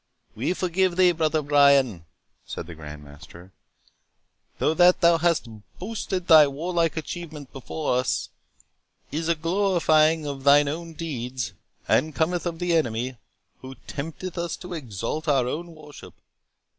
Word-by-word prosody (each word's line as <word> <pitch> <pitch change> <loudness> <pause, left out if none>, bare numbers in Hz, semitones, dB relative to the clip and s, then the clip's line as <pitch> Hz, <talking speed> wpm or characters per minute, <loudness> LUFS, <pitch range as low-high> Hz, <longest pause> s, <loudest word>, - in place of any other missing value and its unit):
"We 130 +11 -1
forgive 185 0 0
thee, 180 -1 +5
Brother 155 -2 0
Brian," 140 - +4 0.4
said - - -7
the 85 - -9
Grand 75 -2 -10
Master; 80 +5 -14 1.1
"though 155 - +1
that 180 +2 +5
thou 170 -1 +5
hast 170 -5 +1 0.3
boasted 190 -2 -4
thy 155 -4 +8
warlike 165 +3 -1
achievements 160 -3 -7
before 135 0 -2
us, 125 0 -1 0.8
is 160 +2 -2
a 170 - +3
glorifying 165 -3 +2
of 140 -2 -5
thine 145 +1 +6
own 165 +3 -5
deeds, 125 - -4 0.3
and 155 -1 +1
cometh 175 +2 0
of 170 -1 -4
the 175 0 0
Enemy, 125 -4 -1 0.4
who 130 0 -10
tempteth 165 +5 -6
us 170 -1 -3
to 180 -1 -8
exalt 135 - -5
our 135 -4 +2
own 165 +5 -5
worship. 150 -2 -13
155 Hz, 140 wpm, -25 LUFS, 130-170 Hz, 1.1 s, thy